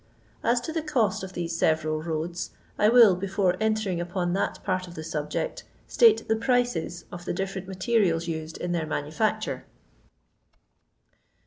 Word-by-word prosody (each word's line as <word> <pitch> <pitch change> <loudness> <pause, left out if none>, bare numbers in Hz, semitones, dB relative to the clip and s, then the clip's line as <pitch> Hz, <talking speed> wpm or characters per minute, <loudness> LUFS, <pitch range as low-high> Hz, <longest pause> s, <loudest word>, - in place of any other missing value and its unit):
As 240 +1 +3
to 320 - -5
the 325 - 0
cost 255 -11 +1
of 190 0 -7
these 170 -2 -3
several 155 -1 +1
roads, 165 +2 -3 0.3
I 210 - +5
will, 230 -5 +7
before 190 0 0
entering 215 -5 0
upon 175 0 -2
that 195 - -1
part 185 -1 -1
of 175 - -11
the 155 - -6
subject, 155 - -3 0.2
state 455 -2 +4
the 220 - +3
prices 230 -8 0
of 175 0 -8
the - - -2
diffioent 190 0 -4
materials 190 -4 +1
used 160 -1 -4
in 175 - -3
their 165 -2 -1
manufitcture. 210 +10 -1
185 Hz, 150 wpm, -26 LUFS, 165-220 Hz, 0.3 s, will